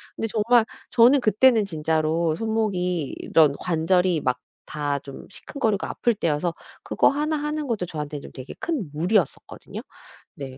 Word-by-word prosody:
근데 225 Hz, -, -2 dB
정말 225 Hz, +2 st, +3 dB, 0.2 s
저는 250 Hz, +3 st, +5 dB
그때는 225 Hz, +1 st, +4 dB
진짜로 160 Hz, -1 st, 0 dB
손목이 185 Hz, -7 st, -1 dB
이런 155 Hz, -3 st, +3 dB
관절이 180 Hz, 0 st, +1 dB
막 125 Hz, -1 st, -1 dB, 0.3 s
다 145 Hz, -2 st, -2 dB
좀 140 Hz, -1 st, -10 dB
시큰거리고 220 Hz, -4 st, -2 dB
아플 235 Hz, -2 st, 0 dB
때여서 165 Hz, -2 st, -1 dB, 0.3 s
그거 -, -, +3 dB
하나 300 Hz, +2 st, -1 dB
하는 300 Hz, 0 st, -3 dB
것도 215 Hz, -7 st, -1 dB
저한테는 150 Hz, -3 st, -6 dB
좀 -, -, -10 dB
되게 130 Hz, 0 st, -9 dB
큰 280 Hz, -, -3 dB
무리였었거든요. 175 Hz, +2 st, -2 dB, 0.5 s
네. 135 Hz, -2 st, -8 dB
180 Hz, 325 characters per minute, -24 LUFS, 155-225 Hz, 0.5 s, 저는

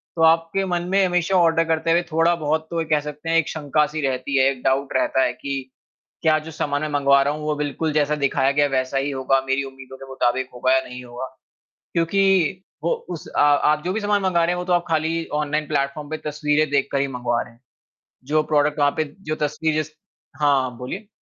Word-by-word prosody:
तो 165 Hz, -, -2 dB
आपके 165 Hz, +4 st, +3 dB
मन 175 Hz, -2 st, -1 dB
में 195 Hz, 0 st, +3 dB
हमेशा 180 Hz, +1 st, +1 dB
ऑर्डर 165 Hz, -2 st, +4 dB
करते 165 Hz, 0 st, +1 dB
हुए 170 Hz, +1 st, +4 dB
थोड़ा-बहुत 160 Hz, -1 st, +1 dB
तो 170 Hz, -, -1 dB
ये -, -, -3 dB
कह 150 Hz, -, +3 dB
सकते 150 Hz, +2 st, -7 dB
हैं, 165 Hz, -, +3 dB
एक 165 Hz, -, +1 dB
शंका-सी 150 Hz, 0 st, 0 dB
रहती 130 Hz, +1 st, -1 dB
है, 130 Hz, -, +5 dB
एक 130 Hz, -2 st, -9 dB
डाउट 135 Hz, +1 st, 0 dB
रहता 130 Hz, 0 st, +2 dB
है -, -, 0 dB
कि 140 Hz, -1 st, -4 dB, 0.6 s
क्या 155 Hz, -2 st, +4 dB
जो -, -, -7 dB
सामान 145 Hz, -2 st, -2 dB
मैं 155 Hz, -, -2 dB
मँगवा 140 Hz, 0 st, +5 dB
रहा 140 Hz, +1 st, +1 dB
हूँ, 150 Hz, 0 st, -7 dB
वो 150 Hz, 0 st, 0 dB
बिल्कुल 150 Hz, +2 st, -2 dB
जैसा 150 Hz, 0 st, +2 dB
दिखाया 135 Hz, 0 st, +2 dB
गया, 145 Hz, +1 st, +2 dB
वैसा 130 Hz, 0 st, -1 dB
ही 140 Hz, +1 st, -1 dB
होगा, 135 Hz, 0 st, +1 dB
मेरी 135 Hz, +1 st, +1 dB
उम्मीदों 130 Hz, -1 st, -11 dB
के 135 Hz, -, -11 dB
मुताबिक 130 Hz, 0 st, 0 dB
होगा 130 Hz, +1 st, +1 dB
या 130 Hz, -, +4 dB
नहीं 125 Hz, 0 st, -9 dB
होगा। 120 Hz, +1 st, -7 dB, 0.7 s
क्योंकि 190 Hz, +1 st, +2 dB, 0.2 s
वो 170 Hz, -, +2 dB, 0.2 s
उस 170 Hz, -3 st, -6 dB
अ, -, -, -1 dB
आप 145 Hz, +1 st, +3 dB
जो 180 Hz, -, -1 dB
भी 220 Hz, -, -2 dB
सामान 205 Hz, -1 st, +1 dB
मँगा 185 Hz, -3 st, +2 dB
रहे -, -, 0 dB
हैं, 180 Hz, -, -2 dB
वो 180 Hz, -, -3 dB
तो 180 Hz, -, -1 dB
आप 175 Hz, -1 st, +2 dB
खाली 165 Hz, +1 st, 0 dB
ऑनलाइन 150 Hz, +1 st, -1 dB
प्लेटफ़ॉर्म 145 Hz, 0 st, -2 dB
पे 155 Hz, -, -2 dB
तस्वीरें 150 Hz, +1 st, +1 dB
देखकर 140 Hz, -1 st, +1 dB
ही 140 Hz, -, +1 dB
मँगवा 120 Hz, -2 st, -1 dB
रहे 120 Hz, -, -13 dB
हैं, 115 Hz, -, -25 dB, 0.6 s
जो 155 Hz, +3 st, +1 dB
प्रोडक्ट 150 Hz, 0 st, +2 dB
वहाँ 145 Hz, 0 st, +4 dB
पे 155 Hz, -, +2 dB, 0.3 s
जो 155 Hz, -, 0 dB
तस्वीर 155 Hz, +2 st, -1 dB
जै 155 Hz, -, -13 dB, 0.5 s
हाँ, 140 Hz, -3 st, +3 dB
आप 125 Hz, -, -6 dB
बोलिए। 180 Hz, -, -6 dB
150 Hz, 225 wpm, -22 LUFS, 135-165 Hz, 0.7 s, है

